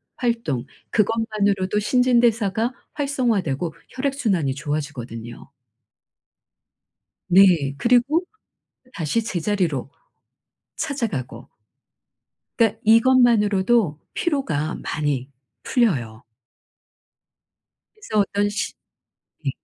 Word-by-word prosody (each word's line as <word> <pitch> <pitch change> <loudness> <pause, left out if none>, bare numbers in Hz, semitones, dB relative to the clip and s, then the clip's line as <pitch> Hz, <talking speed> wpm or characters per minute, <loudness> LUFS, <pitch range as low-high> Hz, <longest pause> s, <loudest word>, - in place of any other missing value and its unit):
활동 230 - -1 0.3
그것만으로도 210 -3 +1
신진대사가 235 -1 +2 0.2
활성화되고 210 - -1 0.2
혈액 275 +1 -2
순환이 185 - 0
좋아지거든요. 130 -6 -5 1.8
네. 175 -7 +5
그리고 250 - +3 0.7
다시 190 +6 -1
제자리로 175 - -1 0.9
찾아가고. 170 - -4 1.1
그러니까 225 -3 +2
이것만으로도 225 - +4 0.2
피로가 165 - -1
많이 145 -4 -2 0.3
풀려요. 130 - 0 1.7
그래서 230 - -2
어떤 205 +1 +1
시 205 +1 -3 0.7
네. - - +1
205 Hz, 210 characters per minute, -22 LUFS, 150-235 Hz, 1.8 s, 네